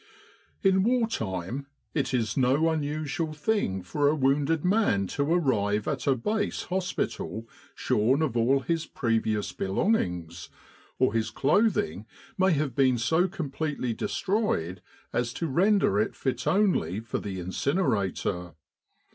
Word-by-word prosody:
In 190 Hz, -1 st, +4 dB
war 235 Hz, +2 st, +2 dB
time 110 Hz, -, -4 dB, 0.3 s
it 145 Hz, -, 0 dB
is 115 Hz, -4 st, 0 dB
no 135 Hz, +5 st, +3 dB
unusual 155 Hz, +1 st, -2 dB
thing 145 Hz, -, -1 dB
for 145 Hz, +10 st, +1 dB
a 150 Hz, -, +2 dB
wounded 145 Hz, +3 st, +1 dB
man 185 Hz, -, +2 dB
to 140 Hz, +2 st, -1 dB
arrive 105 Hz, -, +1 dB
at 140 Hz, -2 st, -2 dB
a 135 Hz, -, +4 dB
base 210 Hz, -, -1 dB
hospital 180 Hz, -10 st, -3 dB, 0.3 s
shorn 130 Hz, +9 st, +2 dB
of 135 Hz, -7 st, -1 dB
all 125 Hz, +4 st, +3 dB
his 165 Hz, +2 st, -1 dB
previous 110 Hz, -3 st, 0 dB
belongings, 90 Hz, -, -1 dB, 0.5 s
or -, -, +2 dB
his 115 Hz, -1 st, 0 dB
clothing 140 Hz, -, +1 dB, 0.3 s
may 190 Hz, -2 st, +3 dB
have 145 Hz, -3 st, 0 dB
been 130 Hz, -1 st, +3 dB
so 160 Hz, +10 st, +2 dB
completely 150 Hz, -7 st, -3 dB
destroyed 150 Hz, -, -1 dB, 0.3 s
as 120 Hz, -1 st, 0 dB
to 170 Hz, -, -3 dB
render 175 Hz, -, +3 dB
it 110 Hz, -, 0 dB
fit 130 Hz, -, -2 dB
only 180 Hz, -, +2 dB
for 115 Hz, 0 st, -4 dB
the 95 Hz, -2 st, -5 dB
incinerator. 95 Hz, -, -1 dB
140 Hz, 130 wpm, -27 LUFS, 110-170 Hz, 0.5 s, In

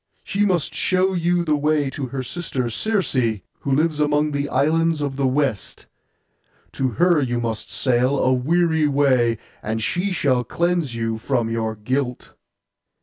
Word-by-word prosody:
She 205 Hz, +1 st, 0 dB
must 175 Hz, -6 st, 0 dB
show 185 Hz, +1 st, +1 dB
you 175 Hz, 0 st, +1 dB
the 155 Hz, -2 st, +2 dB
way 150 Hz, -1 st, +1 dB
to 135 Hz, -2 st, -4 dB
her 130 Hz, +1 st, -4 dB
sister 130 Hz, -5 st, -3 dB
Circe, 210 Hz, -, -1 dB, 0.5 s
who 140 Hz, -, -3 dB
lives 150 Hz, +2 st, +1 dB
among 150 Hz, 0 st, +2 dB
the 145 Hz, 0 st, -2 dB
islands 160 Hz, +4 st, +2 dB
of 140 Hz, -2 st, -3 dB
the 135 Hz, -1 st, +1 dB
West. 130 Hz, -6 st, -2 dB, 0.9 s
To 135 Hz, -, -1 dB
her 175 Hz, -, +3 dB
you 120 Hz, -3 st, -1 dB
must 115 Hz, -2 st, -3 dB
sail, 130 Hz, +1 st, +1 dB
a 130 Hz, 0 st, +2 dB
weary 160 Hz, +4 st, +2 dB
way, 130 Hz, -5 st, +2 dB, 0.2 s
and 110 Hz, +1 st, -2 dB
she 185 Hz, -, -1 dB
shall 130 Hz, -8 st, +1 dB
cleanse 170 Hz, -1 st, -1 dB
you 115 Hz, -1 st, -2 dB
from 120 Hz, -1 st, -1 dB
your 110 Hz, -1 st, -2 dB
guilt. 125 Hz, +4 st, -3 dB
140 Hz, 155 wpm, -22 LUFS, 125-165 Hz, 0.9 s, her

